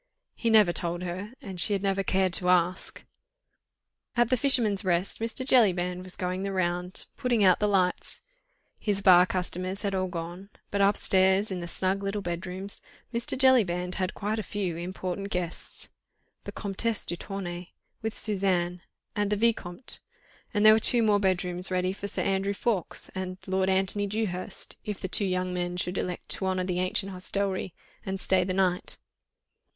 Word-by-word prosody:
He 235 Hz, -, -1 dB
never 210 Hz, -6 st, +5 dB
told 175 Hz, +1 st, -2 dB
her, 185 Hz, +4 st, -5 dB
and 185 Hz, -3 st, -4 dB
she 210 Hz, -, +2 dB
had 195 Hz, -1 st, -1 dB
never 195 Hz, 0 st, +1 dB
cared 190 Hz, -1 st, +1 dB
to 180 Hz, 0 st, -1 dB
ask. 180 Hz, 0 st, +1 dB, 1.1 s
At 240 Hz, 0 st, +3 dB
"The -, -, +5 dB
Fisherman's 225 Hz, -6 st, +4 dB
Rest" 180 Hz, 0 st, 0 dB
Mr. 230 Hz, +3 st, -1 dB
Jellyband 180 Hz, -8 st, +3 dB
was 185 Hz, -1 st, -10 dB
going 185 Hz, +1 st, -3 dB
the 195 Hz, 0 st, -2 dB
round, 180 Hz, 0 st, -1 dB
putting 240 Hz, -5 st, +1 dB
out 185 Hz, -2 st, +5 dB
the 210 Hz, -, +2 dB
lights. 185 Hz, -3 st, 0 dB, 0.6 s
His 200 Hz, -2 st, -1 dB
bar 180 Hz, -1 st, +7 dB
customers 185 Hz, +2 st, -3 dB
had 200 Hz, -1 st, -1 dB
all 185 Hz, 0 st, 0 dB
gone, 175 Hz, +3 st, -6 dB, 0.2 s
but 200 Hz, -, 0 dB
upstairs 195 Hz, 0 st, +3 dB
in 185 Hz, -, -3 dB
the 175 Hz, -, -5 dB
snug 190 Hz, +3 st, -1 dB
little 200 Hz, +1 st, -3 dB
bedrooms, 180 Hz, +3 st, -5 dB, 0.3 s
Mr. 235 Hz, +2 st, +2 dB
Jellyband 190 Hz, -10 st, +3 dB
had 185 Hz, -, -2 dB
quite 215 Hz, +2 st, -2 dB
a -, -, 0 dB
few 195 Hz, -4 st, -3 dB
important 185 Hz, +3 st, -4 dB
guests: 180 Hz, -3 st, -4 dB, 0.6 s
the -, -, -5 dB
Comtesse 210 Hz, +2 st, -2 dB
de 175 Hz, -, 0 dB
Tournay, 175 Hz, -2 st, -6 dB, 0.3 s
with 220 Hz, 0 st, -2 dB
Suzanne, 185 Hz, -4 st, +2 dB, 0.3 s
and 205 Hz, -1 st, 0 dB
the 210 Hz, -, +1 dB
Vicomte, 220 Hz, -2 st, -1 dB, 0.5 s
and 210 Hz, -2 st, +1 dB
there 215 Hz, -, +10 dB
were 220 Hz, -, +4 dB
two 235 Hz, +1 st, +6 dB
more 210 Hz, -2 st, +3 dB
bedrooms 180 Hz, -1 st, 0 dB
ready 185 Hz, 0 st, 0 dB
for 200 Hz, +1 st, -6 dB
Sir -, -, -1 dB
Andrew 195 Hz, +1 st, 0 dB
Ffoulkes 200 Hz, -6 st, -2 dB
and 185 Hz, -1 st, -4 dB
Lord 190 Hz, 0 st, 0 dB
Antony 190 Hz, +2 st, +1 dB
Dewhurst, 200 Hz, -3 st, -3 dB
if 210 Hz, -2 st, -5 dB
the -, -, -3 dB
two 200 Hz, -, +2 dB
young 185 Hz, -1 st, -1 dB
men 175 Hz, 0 st, -2 dB
should 180 Hz, +1 st, -2 dB
elect 180 Hz, -1 st, -4 dB
to 190 Hz, -, -1 dB
honour 185 Hz, -1 st, 0 dB
the 180 Hz, -1 st, -2 dB
ancient 190 Hz, +2 st, 0 dB
hostelry 190 Hz, 0 st, -3 dB, 0.3 s
and 190 Hz, 0 st, -4 dB
stay 185 Hz, -1 st, +2 dB
the 185 Hz, 0 st, -2 dB
night. 185 Hz, -2 st, 0 dB
190 Hz, 175 wpm, -27 LUFS, 180-205 Hz, 1.1 s, there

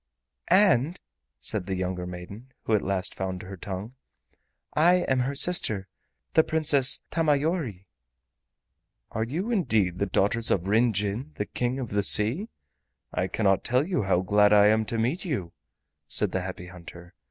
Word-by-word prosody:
"And," 180 Hz, -, +3 dB, 0.4 s
said 90 Hz, -, -2 dB
the 95 Hz, -, -2 dB
younger 90 Hz, -1 st, -3 dB
maiden, 100 Hz, +8 st, -10 dB
who 110 Hz, -, -1 dB
at 105 Hz, -, +3 dB
last 95 Hz, 0 st, -1 dB
found 95 Hz, -1 st, -5 dB
her 95 Hz, +1 st, -8 dB
tongue, 100 Hz, +4 st, -7 dB, 0.8 s
"I 170 Hz, +4 st, +4 dB
am 130 Hz, -1 st, +1 dB
her 135 Hz, +3 st, -1 dB
sister, 110 Hz, -, +2 dB, 0.5 s
the 160 Hz, -, +5 dB
Princess 145 Hz, -5 st, +3 dB
Tamayori." 150 Hz, -, 0 dB, 1.3 s
"Are 110 Hz, -, -2 dB
you 170 Hz, -, -3 dB
indeed 110 Hz, -, +1 dB
the 100 Hz, -, 0 dB
daughters 105 Hz, +5 st, +1 dB
of 95 Hz, -1 st, +1 dB
Ryn 115 Hz, +4 st, +3 dB
Jin, 105 Hz, +8 st, -3 dB
the 105 Hz, -, -3 dB
King 125 Hz, +4 st, -2 dB
of 125 Hz, -4 st, -5 dB
the 100 Hz, 0 st, 0 dB
Sea? 115 Hz, -, +2 dB, 0.6 s
I 90 Hz, -, -1 dB
cannot 95 Hz, 0 st, +1 dB
tell 125 Hz, +4 st, +1 dB
you 185 Hz, -6 st, -1 dB
how 95 Hz, -3 st, +1 dB
glad 105 Hz, +2 st, +3 dB
I 105 Hz, 0 st, +6 dB
am 110 Hz, 0 st, +2 dB
to 115 Hz, -, -3 dB
meet 125 Hz, +11 st, -1 dB
you," 125 Hz, -, -3 dB, 0.6 s
said -, -, -1 dB
the 95 Hz, -, -1 dB
Happy 90 Hz, -1 st, -7 dB
Hunter. 85 Hz, -1 st, -12 dB
110 Hz, 160 wpm, -26 LUFS, 95-140 Hz, 1.3 s, I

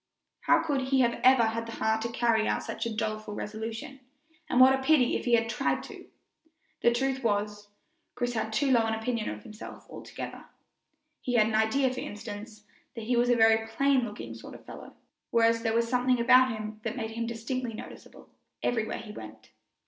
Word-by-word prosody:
How -, -, +5 dB
could 290 Hz, -4 st, 0 dB
he 265 Hz, -1 st, +3 dB
ever 235 Hz, 0 st, 0 dB
have 245 Hz, -3 st, +5 dB
had 230 Hz, 0 st, -3 dB
the 230 Hz, -, -7 dB
heart 220 Hz, 0 st, 0 dB
to 230 Hz, -, -2 dB
carry 230 Hz, -2 st, +1 dB
out -, -, 0 dB
such 235 Hz, -, -4 dB
a -, -, -2 dB
doleful 215 Hz, -1 st, -3 dB
resolution, 225 Hz, +6 st, -6 dB, 0.5 s
and 250 Hz, -, +2 dB
what 260 Hz, +1 st, +8 dB
a 265 Hz, -, 0 dB
pity 265 Hz, -3 st, +3 dB
if -, -, -3 dB
he 240 Hz, -, +1 dB
had 225 Hz, 0 st, +1 dB
tried 230 Hz, -, -1 dB
to! -, -, -11 dB, 0.7 s
The 235 Hz, -, +5 dB
truth 265 Hz, +2 st, -1 dB
was, 210 Hz, -1 st, -1 dB, 0.5 s
Chris 245 Hz, 0 st, -1 dB
had 220 Hz, -1 st, -2 dB
too 270 Hz, +5 st, +1 dB
low 230 Hz, -3 st, +4 dB
an 220 Hz, -, 0 dB
opinion 225 Hz, 0 st, -2 dB
of 105 Hz, 0 st, -7 dB
himself 215 Hz, +1 st, -10 dB
altogether. -, -, -8 dB, 0.8 s
He 245 Hz, -, -2 dB
had 215 Hz, -2 st, +5 dB
an 220 Hz, -, -2 dB
idea, 250 Hz, +5 st, +2 dB
for 255 Hz, -, -5 dB
instance, 210 Hz, 0 st, -8 dB, 0.3 s
that 230 Hz, -, -6 dB
he 245 Hz, +3 st, 0 dB
was 240 Hz, +1 st, +3 dB
a 245 Hz, -, +5 dB
very 225 Hz, -1 st, +4 dB
plain 275 Hz, +4 st, +2 dB
looking 210 Hz, -3 st, -6 dB
sort -, -, -10 dB
of -, -, -12 dB
a -, -, -24 dB
fellow, -, -, -11 dB, 0.3 s
whereas 230 Hz, 0 st, +3 dB
there 225 Hz, -1 st, 0 dB
was 230 Hz, 0 st, +2 dB
something 250 Hz, 0 st, +2 dB
about 255 Hz, +2 st, +6 dB
him 215 Hz, -1 st, -6 dB
that 225 Hz, +3 st, -4 dB
made 220 Hz, -2 st, -3 dB
him 230 Hz, +1 st, -3 dB
distinctly 235 Hz, +1 st, -4 dB
noticeable -, -, -11 dB, 0.4 s
everywhere 225 Hz, -2 st, -1 dB
he 225 Hz, -2 st, -9 dB
went. 110 Hz, -, -11 dB
230 Hz, 200 wpm, -28 LUFS, 220-250 Hz, 0.8 s, what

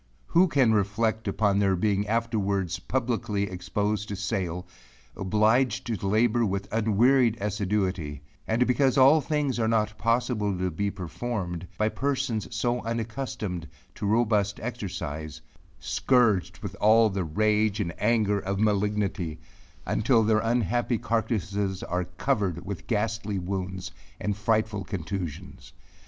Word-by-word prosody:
Who 180 Hz, +2 st, +4 dB
can 135 Hz, -8 st, +3 dB
reflect 110 Hz, +2 st, 0 dB
upon 100 Hz, 0 st, +2 dB
their 100 Hz, -2 st, +3 dB
being 100 Hz, +2 st, 0 dB
afterwards 105 Hz, -5 st, 0 dB
publicly 115 Hz, -5 st, -1 dB
exposed 105 Hz, +2 st, -2 dB
to 100 Hz, -, -3 dB
sale 90 Hz, -2 st, -2 dB, 0.5 s
obliged 110 Hz, +5 st, +2 dB
to 110 Hz, -5 st, -3 dB
labor 115 Hz, +3 st, +3 dB
with 100 Hz, -2 st, -1 dB
unwearied 115 Hz, +2 st, +3 dB
assiduity 95 Hz, -7 st, -2 dB, 0.2 s
and 115 Hz, +3 st, +2 dB
because 130 Hz, +1 st, +2 dB
all 135 Hz, +4 st, +7 dB
things 145 Hz, -4 st, -1 dB
are 110 Hz, -, +2 dB
not 110 Hz, -1 st, +1 dB
possible 115 Hz, -3 st, +1 dB
to 90 Hz, 0 st, -1 dB
be 100 Hz, +6 st, -1 dB
performed, 90 Hz, -1 st, -4 dB
by 110 Hz, 0 st, +2 dB
persons 130 Hz, -4 st, -1 dB
so 120 Hz, +1 st, -1 dB
unaccustomed 115 Hz, -6 st, -4 dB, 0.3 s
to 100 Hz, -, -4 dB
robust 105 Hz, -2 st, +2 dB
exercise, 85 Hz, -, -5 dB, 0.4 s
scourged 105 Hz, -7 st, +2 dB
with 100 Hz, -2 st, -4 dB
all 110 Hz, +1 st, +5 dB
the 95 Hz, -1 st, -1 dB
rage 105 Hz, +5 st, +1 dB
and 85 Hz, -5 st, -2 dB
anger 105 Hz, -2 st, +2 dB
of 100 Hz, 0 st, -3 dB
malignity, 100 Hz, -5 st, 0 dB, 0.5 s
until 115 Hz, 0 st, +3 dB
their 110 Hz, 0 st, +3 dB
unhappy 120 Hz, +1 st, +1 dB
carcasses 105 Hz, -4 st, -1 dB
are 90 Hz, +1 st, -2 dB
covered 90 Hz, -1 st, -1 dB
with 100 Hz, -2 st, -6 dB
ghastly 110 Hz, -2 st, -1 dB
wounds 95 Hz, 0 st, -4 dB, 0.3 s
and 105 Hz, -1 st, -1 dB
frightful 110 Hz, -1 st, 0 dB
contusions? 85 Hz, -, -6 dB
105 Hz, 125 wpm, -27 LUFS, 95-115 Hz, 0.5 s, all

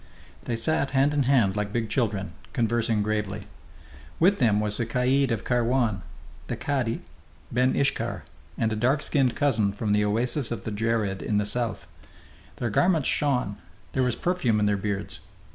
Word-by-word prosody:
They 120 Hz, -, -1 dB
sat 135 Hz, +4 st, 0 dB
hand 140 Hz, +2 st, +4 dB
in 145 Hz, -, +2 dB
hand 110 Hz, -8 st, +4 dB
like 105 Hz, -1 st, -2 dB
big 115 Hz, 0 st, -1 dB
children, 100 Hz, -7 st, -1 dB, 0.2 s
conversing 115 Hz, -2 st, +1 dB
gravely. 105 Hz, -1 st, -2 dB, 0.7 s
With 195 Hz, +4 st, +4 dB
them 110 Hz, -5 st, +3 dB
was 105 Hz, 0 st, -1 dB
the 115 Hz, -, 0 dB
caid 130 Hz, +3 st, +2 dB
of 115 Hz, -, -1 dB
Kairwan, 120 Hz, -4 st, +1 dB, 0.5 s
the -, -, -2 dB
cadi, 130 Hz, -5 st, -2 dB, 0.5 s
ben 125 Hz, +2 st, +2 dB
Iskhar, 140 Hz, 0 st, 0 dB, 0.3 s
and 110 Hz, -1 st, +1 dB
a -, -, -1 dB
dark 130 Hz, +7 st, +1 dB
skinned 130 Hz, -5 st, +1 dB
cousin 110 Hz, -8 st, +2 dB
from 105 Hz, +1 st, -2 dB
the 105 Hz, 0 st, +3 dB
oases 120 Hz, +5 st, 0 dB
of 115 Hz, -4 st, -4 dB
the 110 Hz, -, -4 dB
Djerid 105 Hz, -2 st, -1 dB
in 105 Hz, -, 0 dB
the 105 Hz, -, +1 dB
south. 110 Hz, -2 st, -2 dB, 0.7 s
Their 120 Hz, -2 st, -2 dB
garments 165 Hz, -, +3 dB
shone; 125 Hz, -8 st, 0 dB, 0.4 s
there 130 Hz, -, +1 dB
was 125 Hz, -2 st, +1 dB
perfume 135 Hz, -12 st, +1 dB
in 105 Hz, -, +2 dB
their 105 Hz, 0 st, +2 dB
beards. 100 Hz, 0 st, -3 dB
115 Hz, 170 wpm, -26 LUFS, 105-130 Hz, 0.7 s, hand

